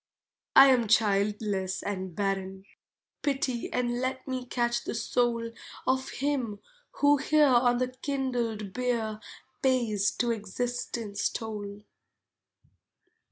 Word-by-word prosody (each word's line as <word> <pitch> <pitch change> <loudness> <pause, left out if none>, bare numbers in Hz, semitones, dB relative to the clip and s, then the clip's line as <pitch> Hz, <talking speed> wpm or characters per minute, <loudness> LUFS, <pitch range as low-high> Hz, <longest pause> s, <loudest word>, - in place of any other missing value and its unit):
I 270 0 +10
am 245 -4 +3
childless 200 -2 +1
and 190 -3 -4
barren; 195 -1 -2 0.6
pity 270 -4 -1
And 240 -1 0
let 260 +1 -3
me 255 -1 -3
catch 240 -1 0
the - - -4
soul 235 0 0 0.3
Of 260 0 +1
him 265 -7 -2 0.4
who 290 0 +6
here 300 +2 +4
on 245 -2 +4
the 255 0 0
kindled 250 -6 -3
bier 235 -4 -1 0.4
Pays 230 -6 +2
to 240 -1 0
Existence 225 -1 -2
toll. 210 -2 -6
240 Hz, 110 wpm, -28 LUFS, 210-255 Hz, 0.6 s, I